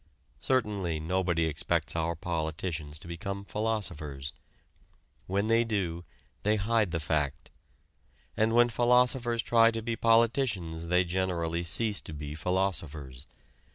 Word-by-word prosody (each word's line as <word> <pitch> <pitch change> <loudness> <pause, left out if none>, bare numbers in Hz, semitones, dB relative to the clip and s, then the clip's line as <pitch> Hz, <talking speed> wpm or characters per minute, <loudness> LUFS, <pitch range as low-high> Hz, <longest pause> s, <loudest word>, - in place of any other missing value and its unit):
Certainly 100 - 0
nobody 85 0 0
expects 80 +1 -1
our 85 +1 0
politicians 80 -2 -3
to 80 - -10
become 100 +3 -5
philosophers. 85 -12 -2 0.9
When 100 +2 0
they 115 +1 +4
do 90 -7 -2 0.4
they 105 +1 +2
hide 110 0 +1
the 85 0 -2
fact. 75 -2 -1 0.8
And 110 +1 +2
when 120 0 +6
philosophers 120 0 +2
try 115 -1 +5
to 115 -1 -3
be 115 0 -1
politicians 115 -8 +2
they 90 +2 +4
generally 85 -2 -1
cease 105 +5 0
to - - -9
be 75 0 -6
philosophers. 80 -7 -2
90 Hz, 120 wpm, -29 LUFS, 80-115 Hz, 0.9 s, when